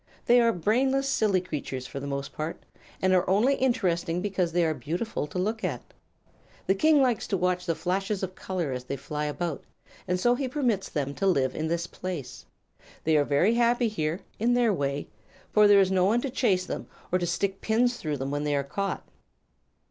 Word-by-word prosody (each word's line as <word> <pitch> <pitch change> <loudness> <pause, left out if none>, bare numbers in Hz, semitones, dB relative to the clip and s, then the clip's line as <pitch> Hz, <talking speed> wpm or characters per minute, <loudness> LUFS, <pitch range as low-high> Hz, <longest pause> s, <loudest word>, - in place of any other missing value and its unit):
They 245 0 +6
are 230 0 +4
brainless, 260 +9 +1
silly 210 -8 +2
creatures, 140 -7 -5
for 140 - -6
the 140 - -6
most 140 0 -4
part, 155 +2 -5 0.4
and 185 0 +4
are 180 -1 +2
only 215 +8 +4
interesting 185 -10 0
because 185 -3 -1
they 175 0 +2
are 160 - +1
beautiful 160 - -3
to 150 - -7
look 215 +4 -1
at. 150 -10 -4 0.7
The 190 - +3
King 295 +7 +4
likes 245 -4 0
to 195 - 0
watch 180 0 0
the 165 - +1
flashes 195 +3 -2
of 185 -1 -3
color 180 -6 -3
as 125 -1 -4
they 140 - -3
fly 150 +3 -4
about, 155 +1 -3 0.4
and 180 0 0
so 240 +6 +4
he 260 +2 -1
permits 245 -8 0
them 140 -2 -2
to 195 - -1
live 135 -8 +2
in 155 - -2
this 170 +1 -1
place. 175 -7 -6 0.6
They 160 0 +2
are 150 - +5
very 145 +10 +3
happy 240 0 +3
here, 165 -3 -2 0.2
in 240 +3 +2
their 240 -3 +3
way, 140 -3 -2 0.4
for 210 -1 +6
there 205 -1 +7
is 190 -1 +3
no 185 -1 +3
one 225 +5 +3
to 275 - -3
chase 195 -8 +1
them - - -5 0.2
or 185 - +2
to 175 - -1
stick 195 +3 -1
pins 240 +2 +2
through 150 -2 -3
them 135 +1 -3
when 145 0 -1
they 145 -1 0
are 140 - +1
caught." 195 +8 -3
185 Hz, 210 wpm, -27 LUFS, 155-220 Hz, 0.7 s, there